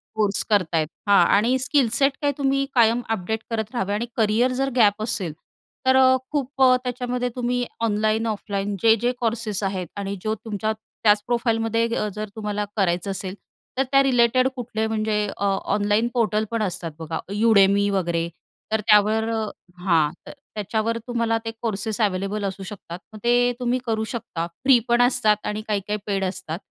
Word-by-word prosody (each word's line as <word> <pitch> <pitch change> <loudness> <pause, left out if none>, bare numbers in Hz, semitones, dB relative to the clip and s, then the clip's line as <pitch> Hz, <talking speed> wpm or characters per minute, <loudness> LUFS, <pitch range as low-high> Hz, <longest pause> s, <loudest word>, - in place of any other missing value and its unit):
Course 210 -2 +1
करत 185 -6 +2
आहेत. 155 -1 +2 0.2
हा 200 - +6 0.2
आणि 240 +5 +2
स्किल 260 -1 +2
सेट 275 0 +4
काही 285 -1 +1
तुम्ही 275 0 +1
कायम 235 0 +4
अपडेट 220 +1 -1
करत 220 +1 -3
राहावे 200 -3 -1
आणि 225 +3 -1
करियर 225 +3 +2
जर 270 0 +1
गॅप 215 -3 +4
असेल, 190 -8 -2 0.5
तर 260 - +5
अ, 260 0 +6 0.2
खूप 275 -2 -3 0.2
त्याच्यामध्ये 250 0 -2
तुम्ही 245 0 -1 0.2
ऑनलाईन 215 +2 +1
ऑफलाईन 205 -1 -3
जे-जे 225 +2 +4
कोर्सेस 225 -3 -1
आहेत 190 -3 -2
आणि 200 0 -3
जो 215 0 0
तुमच्या 215 0 -2 0.3
त्याच 210 -1 +4
प्रोफाईलमध्ये 230 -1 +1
अ, 210 - -1
जर 215 0 -4
तुम्हाला 210 -1 -2
करायचं 190 0 +1
असेल, 190 0 -5 0.4
तर 270 - +3
त्या 275 0 +6
रिलेटेड 255 -1 +3
कुठले 220 -3 -3
म्हणजे 215 -1 -1 0.2
अ, 200 - -1 0.3
ऑनलाईन 205 +3 +2
पोर्टल 220 -2 +1
पण 230 -1 -1
असतात 175 -4 -3
बघा, 160 0 -4
Udemy 200 -2 +4
वगैरे, 170 -3 0 0.4
तर 220 -1 +1
त्यावर 215 +2 +4 0.5
हां. 165 -5 +2 0.2
तर - - -7 0.2
त्याच्यावर 220 +2 -1
तुम्हाला 230 -2 0
ते 225 - -2
कोर्सेस 220 0 -2
अवेलेबल 200 +1 -1
असू 195 0 -4
शकतात. 180 -3 -8
मग 215 - -9
ते 245 +1 +3
तुम्ही 250 +1 0
करू 220 -1 -1
शकता, 170 -7 -4
फ्री 260 +9 +3
पण 240 0 +3
असतात 245 -4 +3
आणि 210 +1 -2
काही-काही 210 0 -1
पेड 195 -1 0
असतात. 185 -2 -4
215 Hz, 165 wpm, -23 LUFS, 200-240 Hz, 0.5 s, हा